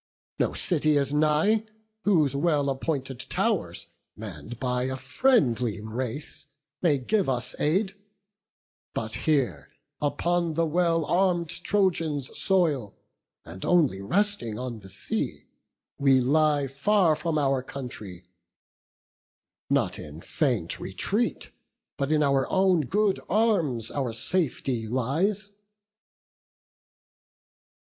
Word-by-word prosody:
No - - +1
city 155 -4 +1
is 140 0 0
nigh, 155 +9 +3 0.4
whose 155 -9 +3
well 145 -2 +2
appointed 135 -2 -3
tow'rs, 130 - -1 0.3
Mann'd 105 +2 -8
by 125 -1 0
a 130 0 -2
friendly 125 - +2
race, 120 +6 -5 0.3
may 155 -5 +3
give 190 +7 0
us 125 -2 -2
aid; 190 +6 +1 1.0
But - - -3 0.2
here, 130 - +1 0.3
upon 170 +2 0
the 165 +1 +2
well 165 0 +1
arm'd 175 -2 +2
Trojans' 165 -10 -1
soil, 155 - +1 0.5
And 85 +4 -9
only 150 - +3
resting 180 - -1
on 125 -3 -5
the 95 -2 -13
sea, - - -4 0.5
we 135 -2 +5
lie 145 +2 +3
Far 160 +5 +2
from 155 +1 -1
our 135 -3 +2
country; 110 -9 -8 1.5
not - - +1
in 75 +1 -9
faint 120 - -1
retreat, 200 - -2 0.5
But 140 +1 -1
in 155 -1 +3
our 140 -1 +2
own 190 -3 +3
good 205 +3 +2
arms, 170 - +1
our 130 -5 -2
safety 130 -4 -1
lies." 170 - 0
145 Hz, 105 wpm, -27 LUFS, 125-175 Hz, 1.5 s, we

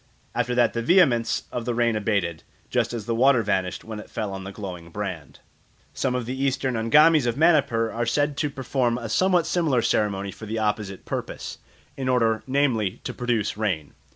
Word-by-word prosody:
After 125 - -1
that 120 -2 +3
the 115 - -1
vehemence 125 -6 +3
of 120 -2 -4
the 120 - -1
rain 120 -1 +2
abated, 100 -6 -1 0.3
just - - +1
as 115 -4 -5
the 115 - -1
water 125 0 +4
vanished 95 -3 -1
when 110 -1 -7
it - - -11
fell 105 -2 -4
on 95 0 -6
the 95 - -6
glowing 90 -5 -7
brand. 95 -4 -6 0.5
Some 125 -2 -1
of 125 -2 -2
the 130 +3 -3
Eastern 130 -1 0
Angamis 150 +5 +5
of 120 +1 -1
Manipur 140 -8 +3
are 120 0 -2
said 145 +4 +1
to 150 - 0
perform 130 -3 -1
a 120 -2 -5
some 185 - +2
what 175 -3 +3
similar 150 -11 +1
ceremony 100 -2 0
for 110 - -10
the 110 +2 -3
opposite 105 -3 -2
purpose, - - -5 0.4
in 130 -1 -3
order, 115 -3 +2
namely, 130 -8 +1
to - - -4
produce 120 -5 -1
rain. 95 -9 -2
115 Hz, 195 wpm, -24 LUFS, 105-130 Hz, 0.5 s, Angamis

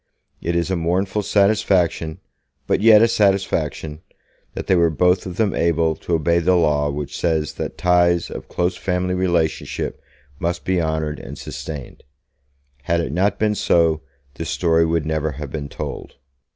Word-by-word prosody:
It 85 +1 -1
is 85 +2 0
a - - +2
mournful 90 +5 0
satisfaction, 100 -6 +1 0.4
but - - +1
yet 110 0 +7
a - - +6
satisfaction, 95 -7 0 0.5
that - - -4
they 95 - +3
were 85 -1 +4
both 90 +5 +2
of 90 - -7
them 105 -4 +1
able 80 -1 +1
to 85 - -1
obey 85 +2 +2
the 90 +2 +3
law 75 -4 +2
which 70 0 -5
says 80 -3 0
that - - -5
ties 85 -1 +2
of - - -7
close 90 +1 -1
family 90 0 -1
relationship 85 -3 -1 0.4
must 85 0 -2
be 95 -2 +1
honoured 80 -1 -2
and - - -9
sustained. 75 -5 -7 0.8
Had 85 -1 +1
it 85 - -2
not 95 +5 +1
been 105 -1 +1
so, 85 -5 +2 0.3
this 80 +2 -6
story 80 -1 +2
would 80 -2 0
never 80 -1 -1
have 70 0 -7
been 75 -2 -5
told. - - -7
85 Hz, 165 wpm, -21 LUFS, 80-90 Hz, 0.8 s, yet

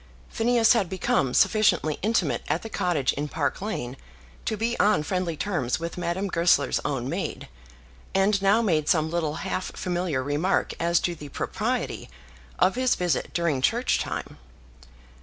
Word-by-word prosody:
Phineas 230 0 +3
had 205 -7 +1
become 180 -8 0
sufficiently 200 -8 +3
intimate 220 +3 +1
at - - -1
the 225 - -6
cottage 150 -8 +1
in 145 +1 -3
Park 145 +1 -2
Lane 165 - -4 0.5
to 220 - -1
be 230 +3 0
on 205 -7 +3
friendly 175 -1 -2
terms 160 -12 -1
with 170 +1 -5
Madame 180 +3 -2
Goesler's 170 -6 +2
own 135 -4 -2
maid, 175 +7 -4 0.7
and 195 +1 +3
now 200 +4 +4
made 155 -8 +1
some 160 -1 +2
little 160 -3 -1
half 185 - -2
familiar 175 -7 -1
remark 145 +7 0
as 170 0 +2
to 175 - -1
the 150 -3 -10
propriety - - -3 0.5
of 185 - +3
his 255 0 +2
visit 175 -6 -1
during 170 -6 +1
church 235 - +2
time. - - -5
175 Hz, 155 wpm, -26 LUFS, 150-200 Hz, 0.7 s, now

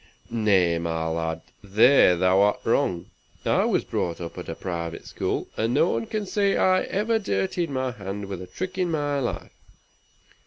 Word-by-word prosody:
"Nay, 95 -7 +2
my 80 -1 -2
lad, 80 0 -2 0.2
there 100 -1 +5
thou'rt 95 +3 +3
wrong. 85 -2 0 0.3
I - - +3
was - - +1
brought 85 -1 -2
up 85 -1 -7
at 90 - -8
a 80 - -4
private 85 -2 -5
school, - - -3
and 115 +3 0
no 160 +4 +4
one 115 0 -2
can 215 -1 -3
say 200 0 +1
I 185 0 +3
ever 220 +3 0
dirtied 155 - -1
my 130 -2 -1
hands 100 -2 -6
with 95 -2 -6
a 90 - -8
trick 185 - -5
in 180 -1 +1
my 145 -3 0
life. 125 - -4
105 Hz, 170 wpm, -25 LUFS, -, 0.3 s, there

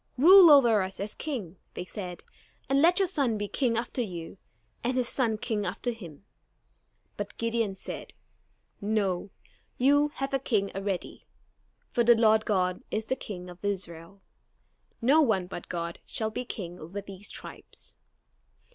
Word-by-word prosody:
"Rule 355 +5 +9
over 240 -8 +7
us 190 0 -3
as 205 +2 -2
king," 210 - -5 0.2
they - - -4
said, 180 -2 -7 0.4
"and 275 +1 +3
let 345 +3 +5
your 390 - +3
son 275 - +1
be 205 0 -3
king 235 0 0
after 240 +2 -2
you, 180 -4 -6 0.4
and 250 +2 0
his 250 -2 +2
son 230 -5 +1
king 215 -1 -2
after 245 +4 -2
him." 185 -7 -11 0.9
But - - -6
Gideon 230 -3 -1
said: - - -7 0.7
"No, 200 -3 0 0.5
you 285 +3 +4
have 270 0 -3
a 270 - +2
king 210 -7 0
already; 195 -2 -4 0.6
for 240 - +2
the 235 0 +7
Lord 220 -1 +4
God 185 -3 +1
is 215 +1 -2
the 260 - 0
King 180 -7 -7
of 180 +1 -12
Israel. 190 -1 -4 0.8
No 285 +6 +6
one 215 -10 +2
but 175 -1 -8
God 170 -1 -4
shall 220 -1 -2
be 250 +3 -4
king 180 -7 -6
over 170 +6 -6
these 200 0 -9
tribes." - - -7
215 Hz, 155 wpm, -28 LUFS, 190-250 Hz, 0.9 s, Rule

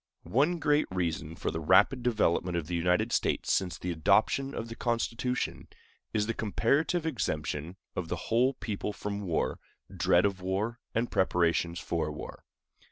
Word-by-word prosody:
One 150 +8 +3
great 150 -1 +2
reason 85 -3 -2
for - - -2
the 80 - -3
rapid 95 - +4
development 95 -7 +1
of 85 - -2
the 90 - -6
United 90 +6 +2
States - - +1
since 90 -2 0
the 90 - -3
adoption 135 - +2
of 115 - -4
the 115 - -7
Constitution 120 +1 -1 0.4
is 105 -2 +1
the 115 - -1
comparative 140 - +1
exemption 80 - -2 0.2
of 90 - -3
the - - -2
whole 125 +4 +1
people 105 -1 -4
from 100 0 -4
war, 85 -5 -1 0.4
dread 90 +2 +4
of 100 -2 -1
war, 100 +6 -2 0.2
and 115 +1 0
preparations 85 -2 +2
for 80 -3 -2
war. 75 - -9
100 Hz, 160 wpm, -30 LUFS, 85-120 Hz, 0.4 s, rapid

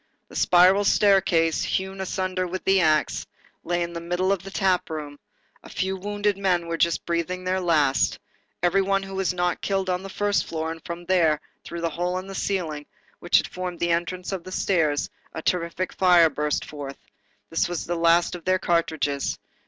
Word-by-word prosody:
The - - -13
spiral 185 +3 +5
staircase, 190 -5 +3
hewn 190 0 -2
asunder 185 -1 -2
with 185 +1 -5
the 195 0 +4
axe, 155 -2 +1 0.4
lay 175 0 0
in 170 0 -5
the 170 - -5
middle 180 +3 0
of 195 -3 0
the 195 - -9
tap 190 -2 +1
room, 150 -2 -6 0.4
a - - -13
few 190 +1 -2
wounded 205 +1 -1
men 180 -3 +1
were 170 0 -2
just 170 0 +1
breathing 170 +2 -2
their 185 +1 0
last, 150 -6 +2 0.5
every 180 +3 +3
one 195 0 +1
who 195 0 -8
was 190 -1 0
not 175 -1 -1
killed 195 -1 -1
was - - +2
on 180 - -2
the 195 - -8
first 205 +1 0
floor, 160 0 -3
and 165 -1 -9
from 170 0 -7
there, 165 -5 +3 0.2
through 170 0 -6
the 170 - 0
hole 180 +3 -2
in 185 - -5
the 195 - -8
ceiling, 165 -7 -2 0.3
which 175 - +3
had - - +1
formed 180 -1 -5
the 170 0 +1
entrance 175 +2 -2
of 190 -3 -4
the 185 - -9
stairs, 160 -7 +1 0.3
a - - -5
terrific 175 +1 -1
fire 175 -3 +5
burst 150 +2 -1
forth. 140 -2 -7 0.5
It 165 +1 +1
was 175 -2 -3
the 175 - -2
last 170 0 +3
of 175 -2 -7
their 185 0 +2
cartridges. 160 -5 0
175 Hz, 200 wpm, -24 LUFS, 165-190 Hz, 0.5 s, spiral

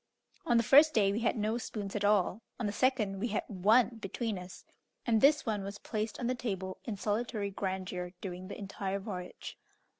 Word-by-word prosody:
On 240 - +4
the 230 - +4
first 295 +7 +7
day 200 -3 +4
we 205 - -1
had 230 0 +1
no 215 +2 0
spoons 205 -4 -5
at 205 - -1
all; 205 0 +3 0.2
on 235 - -1
the 205 - 0
second 215 -4 +1
we 235 - 0
had 215 - -1
one 220 +5 +3
between 215 0 -3
us, 180 0 -11 0.4
and 225 -3 +3
this 300 +2 +5
one 210 -4 -1
was 200 +1 -6
placed 215 +1 -3
on 245 - -2
the 250 - +1
table 190 -7 -4
in 220 -4 -3
solitary 210 0 -1
grandeur 185 -2 -3
during 185 -1 -6
the - - -7
entire 195 -1 -3
voyage. 190 -3 -7
210 Hz, 200 wpm, -32 LUFS, 195-230 Hz, 0.4 s, first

